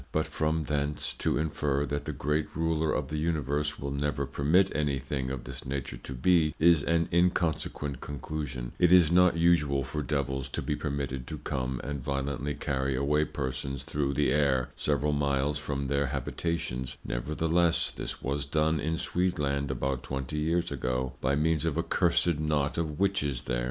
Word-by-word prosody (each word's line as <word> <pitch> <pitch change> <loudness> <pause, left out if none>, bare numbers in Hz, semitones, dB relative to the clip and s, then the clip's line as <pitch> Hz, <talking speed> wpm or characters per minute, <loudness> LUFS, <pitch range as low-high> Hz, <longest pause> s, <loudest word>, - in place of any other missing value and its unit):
But - - +1
from 80 +1 0
thence 75 0 -1
to - - +1
infer, 75 -2 0
that 70 0 -3
the - - -2
great 75 +2 -1
Ruler 80 -1 +1
of - - -1
the 75 0 -2
Universe 75 -2 0
will 70 0 -4
never 70 0 -1
permit 85 +9 +2
any 75 -3 +1
thing 65 0 -3
of 65 -2 -4
this - - -8
nature 65 -2 -4
to 65 - -8
be, 80 +3 +3
is 85 -1 +5
an 85 0 +2
inconsequent 85 -5 +1
Conclusion; 70 -3 -5
it 90 -1 +5
is 90 -3 +7
not 90 -1 +5
usual 75 -5 +3
for 75 - -3
Devils 65 -1 -2
to - - -3
be 75 - -1
permitted 70 -4 -3
to 80 - -5
come 65 -4 -3
and 70 -2 -4
violently 70 +1 -2
carry 65 -1 -1
away 75 +3 +2
persons 65 -1 -3
through 70 -3 -1
the 70 -2 +2
Air, 65 -4 +2
several 75 0 +1
miles 70 0 +1
from 70 -2 -3
their 70 +1 +1
Habitations: 70 -1 -3
Nevertheless, 80 +6 +1
this - - -6
was 70 +1 -1
done 80 +1 +2
in 80 +2 -1
Sweedland 75 -7 0
about 65 0 -1
twenty 70 +3 -4
Years 85 +3 0
ago, 65 0 -2
by 70 +2 +2
means 80 +1 +2
of 80 -2 0
a 85 - +1
cursed 85 -2 +2
Knot 75 -1 0
of 75 -3 -3
Witches 75 -10 +1
there. - - -1
75 Hz, 175 wpm, -29 LUFS, 70-80 Hz, -, is